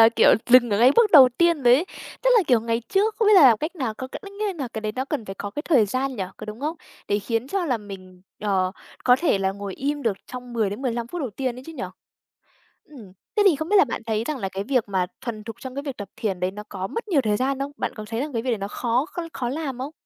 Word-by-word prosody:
là, 225 - +9
kiểu, 230 - +5 0.2
dừng 245 -1 +7
ở 205 - +1
ngay 250 +3 +7
bước 455 -3 +5
đầu 265 -5 +10
tiên 340 -4 +3
rồi 245 0 +7
ấy. 315 +7 +2 0.4
Tức - - +3
là, 435 - +5
kiểu, 245 -4 +4
ngày 230 +1 -1
trước 425 +3 +2
không 435 -2 +3
biết - - +6
là 370 - +8
làm 240 -6 +7
cách 320 +5 -4
nào 255 -8 -2
có 260 +3 -7
nghĩa 400 0 -4
là 275 -7 -4
cái 220 - -6
đấy 215 -1 -3
nó 255 +3 -2
cần 275 -5 -3
phải 195 - -7
có 205 - -6
cái 295 +8 -5
thời 250 -11 +3
gian 260 +4 -2
nhỉ, 200 - -2
có 215 - -9
đúng 215 +3 -8
không? 310 +4 -2 0.3
Để 205 - +2
khiến 230 +4 -2
cho 385 +2 -1
là 250 -7 0
mình, 185 -3 -11 0.2
ờ, 190 -3 0 0.3
có 250 0 +6
thể 330 - +2
là 190 0 0
ngồi 200 -1 -6
im 285 +1 -2
được 215 -4 0
trong 250 -1 -8
10-15 230 +2 -1
phút 350 +7 -6
đầu 260 -7 -3
tiên 255 +2 -3
ấy 255 - -9
chứ 325 - -8
nhỉ? 295 - -6 1.0
Ừm, 225 -11 -14 0.2
thế 420 - +5
thì 335 -7 +5
không 315 +3 -4
biết 415 - +4
là 390 - +7
bạn 230 - -5
thấy 220 0 -1
rằng 300 0 -3
là 195 -5 -2
cái 195 +1 -5
việc 250 -4 0
mà 185 -2 0
thuần 220 -4 -6
thục 225 -1 -7
trong 260 -1 -7
cái 280 - -4
việc 275 -3 -5
tập 205 -2 -7
thiền 195 -5 -2
đấy 180 - 0
nó 210 +2 -8
có 190 -1 -4
mất 460 - -5
nhiều 315 -7 +3
thời 215 -4 +1
gian 270 +2 0
không? 275 +1 -4
Bạn - - -3
có 215 - -7
thấy 225 +1 -2
rằng 295 +2 -3
cái 230 -2 -2
việc 255 - -1
đấy 225 - 0
nó 200 +1 -4
khó 245 +6 0
kh - - -2
khó 250 -3 -3
làm 275 -1 -4
không? 270 +4 -5
245 Hz, 295 wpm, -24 LUFS, 215-285 Hz, 1.0 s, đầu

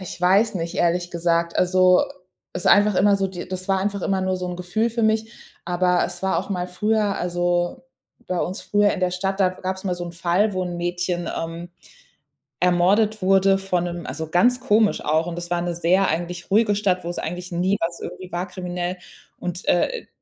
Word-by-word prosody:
Ich 180 -1 -8
weiß 195 +5 +3
nicht, 170 -1 -3
ehrlich 175 +1 +1
gesagt. 170 0 0
Also, 185 0 +4 0.5
es 180 - -5
ist - - +5
einfach 205 0 +5
immer 200 +1 +5
so 195 - 0
die 175 -2 -7
das 185 +1 -6
war 195 - +3
einfach 200 0 -2
immer 190 -1 0
nur 185 0 0
so 180 0 -4
'n 175 - -5
Gefühl 215 +6 -1
für 230 0 -2
mich. 220 +1 +1 0.3
Aber 180 0 +2
es - - -9
war 190 -3 +1
auch 190 - -5
mal 180 -2 -2
früher 210 +2 0
also, 175 +6 -1 0.4
bei 180 - -2
uns 185 +3 -3
früher 205 0 +2
in 190 - -4
der 180 -1 +1
Stadt, 195 +2 -2
da 185 -1 +4
gab's 185 +1 -5
mal 180 -2 0
so 175 0 -6
'n 170 - -7
Fall, 180 +5 +1
wo 185 - -1
'n 175 -1 -4
Mädchen, 175 0 -2
ähm, 165 +1 -6 0.9
ermordet 195 +4 +3
wurde 195 +1 +4
von 185 -2 -1
'nem 175 -1 -5
also, 160 0 -5
ganz 245 +9 +3
komisch 220 -4 +2
auch. 160 +3 +1
Und 170 - -4
das 175 0 -6
war 175 0 +1
'ne 175 -1 -2
sehr 180 +3 +2
eigentlich 175 +2 -3
ruhige 210 0 +4
Stadt, 190 -3 0
wo's 175 +1 -4
eigentlich 180 +3 -5
nie 185 +3 +1
was 170 +1 -2
irgendwie 180 +1 -8
war 175 +2 -3
kriminell. 180 0 -4 0.4
Und, 180 +1 -5
äh, 480 - +1
180 Hz, 210 wpm, -23 LUFS, 175-195 Hz, 0.9 s, ist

